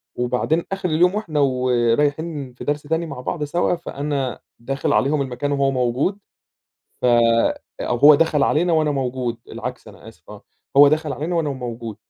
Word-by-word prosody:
وبعدين 125 +7 0
آخر 195 -2 -2
اليوم، 180 +5 +3
وإحنا 165 -9 -2
ورايحين 130 +3 0
في - - -10
درس 145 0 -1
تاني 160 +3 -1
مع 125 -6 -7
بعض 150 +3 -3
سوا، 170 +4 0
فأنا 140 -5 -4 0.2
داخل 135 +3 -2
عليهم 140 +2 +2
المكان 135 +2 -3
وهو 140 -1 +1
موجود 130 +10 0 0.8
ف - - +2 0.7
أو 120 - -1
هو 145 +5 +8
دخل 150 -1 +2
علينا 170 +5 +2
وأنا 155 -2 +2
موجود، 125 -3 -2
العكس - - -7
أنا - - -14
آسف - - -17
آه، - - -11 0.3
هو 145 0 +9
دخل 155 0 0
علينا 165 +4 -3
وأنا 160 -3 0
موجود، 120 -4 -6
145 Hz, 165 wpm, -21 LUFS, 125-155 Hz, 0.8 s, هو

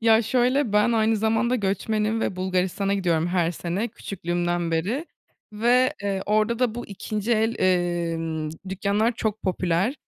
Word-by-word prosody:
Ya, 225 0 +5
şöyle, 250 +1 +1
ben 210 +3 +3
aynı 220 0 +2
zamanda 225 +3 +1
göçmenim 215 +2 0
ve 190 - -2
Bulgaristan'a 185 +1 0
gidiyorum 170 -4 +1
her 175 -2 +1
sene, 175 +6 -3
küçüklüğümden 175 -5 -2
beri 205 - -1 0.5
ve, 245 +4 +3
eee, 195 -1 -1
orada 215 +2 +2
da 245 -3 +1
bu 240 - -6
2'nci 210 +3 -3
el, 225 +1 +2
emm, 170 -3 0 0.2
dükkânlar 200 +4 +1
çok 220 -2 -3
popüler. 185 +5 0
205 Hz, 145 wpm, -24 LUFS, 175-225 Hz, 0.5 s, Ya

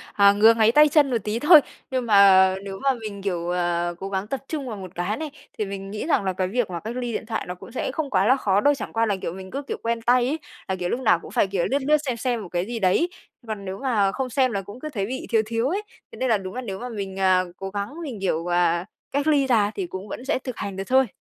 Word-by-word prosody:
ờ, 200 -1 +6
ngứa 220 +2 +6
ngáy 225 0 +4
tay 300 +2 +7
chân 290 -2 +4
một 240 - +1
tí 215 +2 -1
thôi, 300 +4 +8 0.3
nhưng 255 -2 -1
mà 190 -2 +6
nếu 195 -1 -6
mà 275 -1 +3
mình, 215 -4 -7
kiểu, 175 -3 -2
ờ, 175 -1 0
cố 195 - -5
gắng 195 0 -2
tập 265 +4 -3
trung 285 -5 -4
vào 220 - -5
một 185 -3 -8
cái 180 +4 -2
này, 310 -1 -5 0.3
thì 215 - 0
mình 195 0 -6
nghĩ 215 +7 -4
rằng 285 -11 +2
là 190 - 0
cái 185 0 -1
việc 235 -1 -1
mà 170 -2 -4
cách 230 +3 -6
ly 245 -2 -3
điện 220 - -4
thoại 225 -1 -3
nó 180 - -3
cũng - - -13
sẽ 255 - -2
không 290 -2 -3
quá 195 - +2
là 260 +4 +5
khó 200 -5 +2
đâu, 290 +3 +4
chẳng 275 - -6
qua 230 0 +1
là, 200 -2 0
kiểu, - - -3
mình 190 +1 -9
cứ, 280 +6 -4
kiểu, - - -5
quen 230 0 -1
tay 245 +1 +3
ấy, 310 - -1 0.3
là, 190 - -1
kiểu, 180 -1 -3
lúc 240 - -1
nào 220 -9 +4
cũng - - -12
phải, - - +2
kiểu, 190 -3 -1
lướt 280 +1 +1
lướt, 305 0 +5
xem 245 -2 -1
xem 240 -2 -1
một 180 - -8
cái 175 +2 -2
gì 235 0 -4
đấy. 195 - +2 0.4
Còn 215 -2 -5
nếu 190 0 -5
mà 215 -8 +1
không 260 -2 -3
xem 255 -1 +2
là 195 -1 -2
cũng 205 +6 -11
cứ 310 - -5
thấy 205 -9 -3
bị 260 +3 -5
thiếu 225 -2 +3
thiếu 230 +3 0
ấy, 390 +6 -1 0.3
thế - - -10
nên 260 - 0
là 220 - +4
đúng 185 -1 -7
là 255 - -3
nếu 195 -6 -5
mà 250 - -6
mình, 195 -4 -5
à, 185 -1 +4
cố 195 0 -6
gắng, 200 +5 -4
mình, 255 -9 -6
kiểu, 175 -3 -1
ờ, 175 0 +2 0.3
cách 285 +1 0
ly 290 -3 +3
ra 215 -5 +3
thì 190 -3 -3
cũng 190 +3 -7
vẫn 245 - -7
sẽ 280 - 0
thực 255 -2 -7
hành 195 -1 -5
được 195 - -3
thôi. 260 0 +4
215 Hz, 300 wpm, -24 LUFS, 190-255 Hz, 0.4 s, thôi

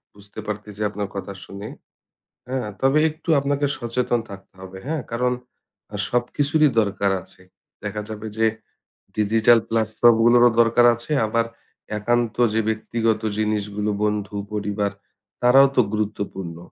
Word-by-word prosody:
বুঝতে 100 +1 -11
পারতেছি 105 0 -6
আপনার 105 -1 -4
কথা 100 0 -5
শুনে। 100 +2 -8 0.8
হ্যাঁ? 130 -4 -2
তবে 135 +3 +3
একটু 160 +2 -16
আপনাকে 140 +1 0
সচেতন 120 0 -1
থাকতে 100 0 -11
হবে। 95 0 -9
হ্যাঁ? 155 -1 -2
কারণ 125 +1 +1 0.8
সবকিছুরই 145 +5 +2
দরকার 100 -1 0
আছে। - - -19 0.4
দেখা 105 +1 -3
যাবে 110 0 -6
যে, 110 - +4 0.7
ডিজিটাল 110 +2 +4
প্লাটফর্ম 115 +1 +3
গুলোরও 120 +1 +6
দরকার 120 +1 +5
আছে। 120 +5 -7
আবার 115 +2 +1 0.5
একান্ত 120 +1 0 0.2
যে, 110 - +3
ব্যক্তিগত 110 0 0 0.2
জিনিসগুলো 105 -1 -1
বন্ধু, 105 -1 -2 0.2
পরিবার, 105 0 -1 0.5
তারাও 135 +3 +7
তো - - +6
গুরুত্বপূর্ণ। 100 -5 -3
110 Hz, 125 wpm, -22 LUFS, 105-120 Hz, 0.8 s, তারাও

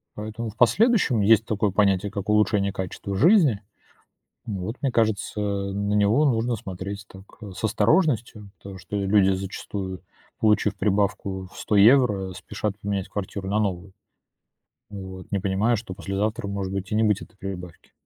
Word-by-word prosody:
Поэтому 110 +2 -5
в 105 - -17
последующем 190 - +3
есть 110 +2 +5
такое 105 -1 0
понятие, 100 0 +2
как 100 -1 -5
улучшение 105 -2 +2
качества 95 +1 -5
жизни. 150 - +4 0.9
М, 100 -4 -3
вот 110 +6 -4
мне 135 - 0
кажется, 110 -3 0
э, 100 -1 -2
на 100 +1 -1
него 105 +8 +3
нужно 120 -2 +1
смотреть 100 0 -7
так, 95 0 -13 0.2
э, 105 -2 -8
с 95 - -10
осторожностью, 110 - +1
потому 95 -1 -10
что, 100 - -7
э, 100 -1 -1
люди 95 -1 +4
зачастую, 95 0 -5 0.4
получив 105 -1 +2
прибавку 100 -2 -1
в - - -15
100 105 - -1
евро, 105 -3 +4
спешат 105 +2 -4
поменять 100 -1 -3
квартиру 95 -1 -5
на 105 - +1
новую. 95 -2 -2 1.0
Вот, 95 -2 -9
не 100 - 0
понимая, 100 +5 +1
что 105 -3 -7
послезавтра 100 +2 -3
может 100 -1 -3
быть 95 -1 -4
и - - 0
не 110 - +3
быть 105 -2 +2
этой - - -13
прибавки. 90 -3 -8
100 Hz, 165 wpm, -24 LUFS, 95-110 Hz, 1.0 s, есть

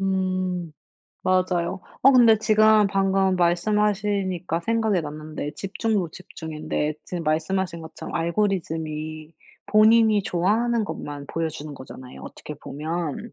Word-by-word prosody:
음. 185 -3 -1 0.5
맞아요. 185 -1 +1 0.2
어 270 - +7
근데 235 -4 +6
지금 215 -1 +5
방금 195 -1 +2
말씀하시니까 190 -1 +1
생각이 220 -2 +1
났는데 155 -1 -6
집중도 205 -1 -1
집중인데 155 -3 -4
지금 175 -2 -5
말씀하신 170 +3 -1
것처럼 160 0 -9
알고리즘이 160 -4 -2 0.3
본인이 215 0 +5
좋아하는 220 +7 +1
것만 145 -7 -6
보여주는 155 -2 -4
거잖아요, 130 - -11
어떻게 - - -9
보면. 160 - -5
185 Hz, 295 characters per minute, -24 LUFS, 160-210 Hz, 0.5 s, 어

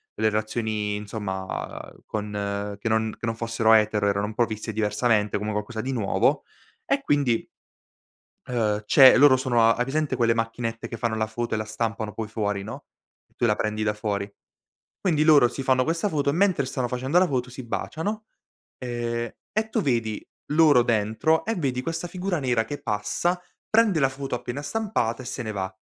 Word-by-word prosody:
le 110 0 +2
relazioni 110 -1 -2
insomma 100 -2 -5
con 105 -1 -3
che 110 +2 -2
non 110 0 0
che - - -5
non 115 -1 -1
fossero 115 -1 +2
etero, 105 -1 +3
erano 100 0 +1
un 110 - -5
po' 120 +2 +2
viste 110 0 -5
diversamente 105 0 +1
come 105 +1 -3
un 110 - -2
qualcosa 110 +1 -3
di 130 - -3
nuovo, 110 -6 +1 0.4
e 275 0 +1
quindi 140 -6 +1 1.0
ehm, 110 -4 0
c'è 130 +4 +8
loro 140 -1 +7
sono 130 -3 +1
a 115 0 +5
hai 120 - 0
presente 145 +1 -1
quelle 115 -1 +3
macchinette 115 0 -3
che 115 - -6
fanno 115 -1 -1
la 110 0 0
foto 115 +1 -3
e - - 0
la 110 - -2
stampano 110 0 -3
poi 110 -1 -4
fuori, 105 -3 -2
no, 105 - -8 0.5
tu - - -1
la 105 -2 +2
prendi 110 0 -2
da 105 -1 +1
fuori. 105 -2 -3 0.7
Quindi 155 -5 +2
loro 150 -5 +6
si 135 +2 -5
fanno 130 -1 +3
questa 165 +7 0
foto 145 -3 0
e - - +1
mentre 180 -5 +2
stanno 130 -1 -2
facendo 130 +6 0
la 185 - +3
foto 125 -2 -2
si 130 0 -9
baciano 205 - -3 0.5
e 120 -1 -3 0.2
e 220 +1 -1
tu - - 0
vedi 115 -6 -1 0.3
loro 150 -6 +6
dentro 115 +8 +1
e 225 +2 -1
vedi 130 -7 -1
questa 165 +4 -3
figura 180 0 -2
nera 125 -4 +1
che 145 +5 -7
passa, 105 - -1 0.3
prende 215 -6 +4
la 135 - +4
foto 135 0 -4
appena 125 +3 -5
stampata 170 - -1
e - - -10
se 130 0 -4
ne 110 - -4
va. 95 -2 -2
115 Hz, 190 wpm, -25 LUFS, 110-140 Hz, 1.0 s, c'è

